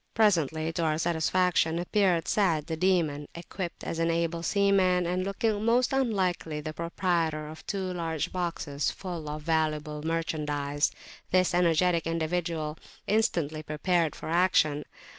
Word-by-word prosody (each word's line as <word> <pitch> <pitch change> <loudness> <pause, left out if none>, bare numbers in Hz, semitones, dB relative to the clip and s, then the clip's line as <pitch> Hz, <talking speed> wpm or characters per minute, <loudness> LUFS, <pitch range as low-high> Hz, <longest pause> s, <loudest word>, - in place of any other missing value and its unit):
Presently, 165 -7 +2
to 170 - -1
our 155 -1 +1
satisfaction, 170 0 +1
appeared 180 -1 +1
Sa'ad 170 -8 +2
the 165 -1 -3
Demon, 160 -5 +1
equipped 175 +1 -6
as 165 - -4
an 165 0 +2
able 170 0 0
seaman, 185 -1 +3
and 180 +2 0
looking 205 +2 -1
most 240 +3 +2
unlike 205 -9 +1
the 155 0 -5
proprietor 170 -3 -1
of 155 +1 -10
two 190 -2 -2
large 165 -3 -2
boxes 165 -5 -2
full 170 -5 -6
of 150 0 -5
valuable 155 -2 0
merchandise. 150 -3 -1 0.4
This 185 -1 +3
energetic 170 -1 +3
individual 165 -1 -2 0.3
instantly 170 -8 0
prepared 155 +1 0
for - - -8
action. 160 -4 +3
170 Hz, 135 wpm, -28 LUFS, 155-185 Hz, 0.4 s, seaman